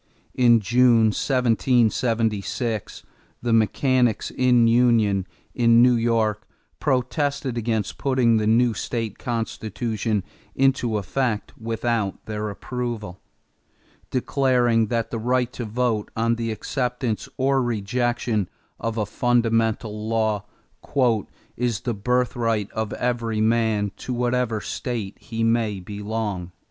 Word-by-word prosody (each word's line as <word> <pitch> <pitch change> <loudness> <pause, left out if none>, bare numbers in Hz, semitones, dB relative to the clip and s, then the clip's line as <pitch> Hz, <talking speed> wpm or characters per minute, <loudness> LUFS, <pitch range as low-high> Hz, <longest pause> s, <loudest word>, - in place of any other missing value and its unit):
In 120 -2 +5
June, 115 0 +4
1776, 115 -2 0 0.4
the 120 -1 0
"mechanicks 120 +1 +2
in 125 -2 +4
union" 115 -5 +3 0.3
in 115 -1 +5
New 125 0 +6
York 115 -3 0 0.3
protested 135 0 0
against 110 -3 -2
putting 130 -4 +3
the 105 -1 0
new 115 +1 +4
state 115 -1 -4
constitution 110 -2 -2 0.3
into 130 -4 +2
effect 110 +2 -2
without 115 -2 -2
their 105 0 -3
approval, 110 -3 -5 0.9
declaring 125 -3 +2
that 115 0 -2
the 115 - -2
right 125 +1 0
to 120 - -5
vote 110 -1 -1
on 115 +1 +1
the 115 -1 -3
acceptance 125 0 -2
or 135 0 +2
rejection 120 -2 -1 0.3
of 115 0 -3
a 105 - 0
fundamental 115 -1 0
law 110 -2 0 1.1
"is 120 -3 -1
the 120 - -2
birthright 115 -1 0
of 110 -1 -3
every 115 -3 -1
man 110 -2 +1
to 125 - -4
whatever 120 -2 0
state 115 -6 -4
he 115 0 -4
may 115 -3 +1
belong." 100 -2 -4
115 Hz, 110 wpm, -23 LUFS, 110-125 Hz, 1.1 s, New